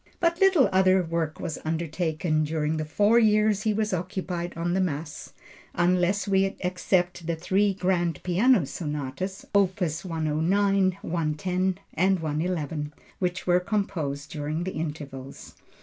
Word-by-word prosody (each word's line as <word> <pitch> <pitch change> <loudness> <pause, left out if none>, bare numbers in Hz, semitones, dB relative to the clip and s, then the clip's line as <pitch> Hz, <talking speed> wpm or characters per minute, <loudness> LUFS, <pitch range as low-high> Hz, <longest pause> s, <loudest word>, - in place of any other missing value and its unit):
But 340 0 +1
little 380 -9 +6
other 185 0 +4
work 165 -2 -2
was 160 - -4
undertaken 160 0 -1
during 155 0 -1
the 155 - -2
four 205 +9 +4
years 215 -2 +3
he 215 0 +1
was 215 -1 0
occupied 180 -1 -3
on 170 +1 -1
the 190 - +2
Mass 150 -4 -4 0.4
unless 180 +3 +2
we 195 0 +2
except 180 -1 0
the 170 - 0
three 195 +4 +1
grand 175 -4 0
piano 195 - +3
sonatas, 150 +5 -4
opus 185 -5 +1
109, 185 +4 +1
110 180 +3 -1 0.2
and 190 +2 +2
111, 155 -1 -2 0.3
which 180 0 -2
were 180 0 +4
composed 170 -8 -2
during 155 +2 -3
the 185 - -4
intervals. 145 -4 -6
175 Hz, 135 wpm, -26 LUFS, 155-190 Hz, 0.4 s, little